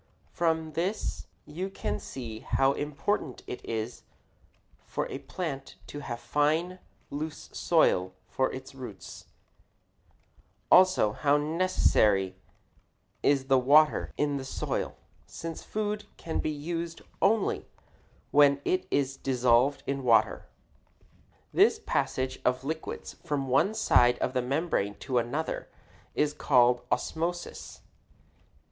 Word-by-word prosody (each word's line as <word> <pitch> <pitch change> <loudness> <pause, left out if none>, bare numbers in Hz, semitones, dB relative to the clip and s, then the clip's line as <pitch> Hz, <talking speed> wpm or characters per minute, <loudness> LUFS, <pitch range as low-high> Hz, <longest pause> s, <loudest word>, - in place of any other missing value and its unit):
From 160 -2 0
this 180 +7 -2 0.2
you 180 +6 -4
can 105 - -3
see 115 0 -7
how 135 +4 +2
important 145 +1 -2
it 125 - -7
is 115 +1 -4 0.9
for - - -2
a - - -4
plant 145 -7 -5
to 145 - -7
have 120 -5 -5
fine, 160 +7 0 0.3
loose 150 +2 -5
soil 90 +1 +2
for 130 - 0
its 130 +2 -8
root 125 -6 -7
hairs; - - -10 1.5
also 185 - +6
how 145 +6 +2
necessary 145 - +2 0.9
is 140 -2 +2
the 135 -1 +4
water 150 +4 +4
in 145 -1 +1
the 135 - -5
soil, 130 - -3 0.3
since 165 -1 -6
the - - -18
food 210 0 -2
can 165 - -3
be - - -1
used 165 +3 -4 0.2
only 210 +1 +2 0.6
when 145 -1 +6
it 185 - 0
is 135 -1 0
dissolved 130 +1 +2
in 140 0 -2
water. 120 -3 +3 1.1
This - - +5
passage 130 0 -2
of 125 +1 +1
liquids 160 +3 -5
from 145 -5 -2
one 170 +12 +3
side 125 - +4
of 130 - -2
a 125 - +2
membrane 125 - -1
to 130 -3 +1
another 140 +7 -3 0.5
is 150 0 +1
called 125 -4 +4
osmosis. 175 +2 -3
140 Hz, 120 wpm, -29 LUFS, 125-160 Hz, 1.5 s, also